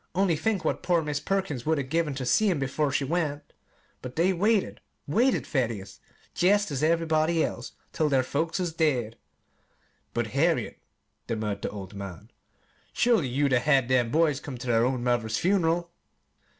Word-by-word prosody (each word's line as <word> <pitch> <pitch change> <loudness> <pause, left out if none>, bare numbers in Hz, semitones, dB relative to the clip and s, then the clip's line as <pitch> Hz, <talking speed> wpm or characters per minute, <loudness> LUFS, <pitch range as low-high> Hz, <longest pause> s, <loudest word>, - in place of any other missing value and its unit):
Only 190 -3 +2
think 200 +5 -1
what - - 0
poor 175 -2 +1
Mis' 150 -1 -2
Perkins 160 -6 -2
would 160 +2 +1
'a' 140 - -1
given 150 +1 -1
ter 130 -1 -4
seen 210 - +3
'em 135 - -1
'fore 145 +1 0
she 140 - 0
went! 150 -1 -2 0.5
But 125 -1 -8
they 180 +4 +2
waited 205 +3 +1 0.2
waited, 240 - +2
Thaddeus, 115 - -3 0.3
jest 205 0 +2
as 135 -1 -2
everybody 160 0 +2
does, 120 - -4 0.2
till 155 -1 +1
their 135 -2 +3
folks 160 +7 -2
is 175 -3 -2
dead." 130 -9 0 1.0
"But, - - -1
Harriet," - - +1 0.5
demurred 105 -3 -3
the - - -2
old 100 -1 -8
man, 100 -4 -8 0.6
"surely 230 - +2
you'd 135 +2 +1
'a' 125 - +5
had 135 -2 +2
them 125 -2 +2
boys 150 0 +2
come 140 -3 -7
ter 120 0 -3
their 115 0 +3
own 125 -1 -1
mother's 115 -3 0
fun'ral!" 170 -2 +1
150 Hz, 170 wpm, -27 LUFS, 125-170 Hz, 1.0 s, a